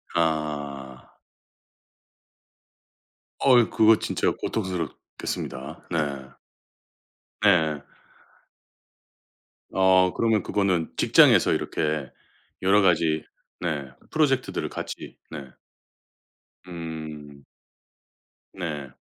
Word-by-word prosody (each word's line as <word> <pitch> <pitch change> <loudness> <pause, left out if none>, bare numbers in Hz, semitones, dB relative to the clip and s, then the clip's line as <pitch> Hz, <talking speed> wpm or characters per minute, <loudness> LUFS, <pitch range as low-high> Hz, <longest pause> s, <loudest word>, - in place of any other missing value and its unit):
아. 75 -5 -2 2.3
어이 125 -4 +5
그거 110 0 +5
진짜 - - 0
고통스럽겠습니다. 85 -6 -5
네. 70 -5 -2 1.1
네. 80 -8 +3 1.9
어 95 -1 +4
그러면 110 -4 +1
그거는 95 -5 0
직장에서 - - +5
이렇게 75 -3 -2 0.5
여러 100 +2 +4
가지 80 -4 +2 0.4
네. 80 -6 -2 0.2
프로젝트들을 135 -5 +1
같이 - - -7
네. 75 -4 -7 1.2
음. 80 -4 -8 1.1
네. 75 -8 -5
80 Hz, 150 characters per minute, -25 LUFS, 75-95 Hz, 2.3 s, 어이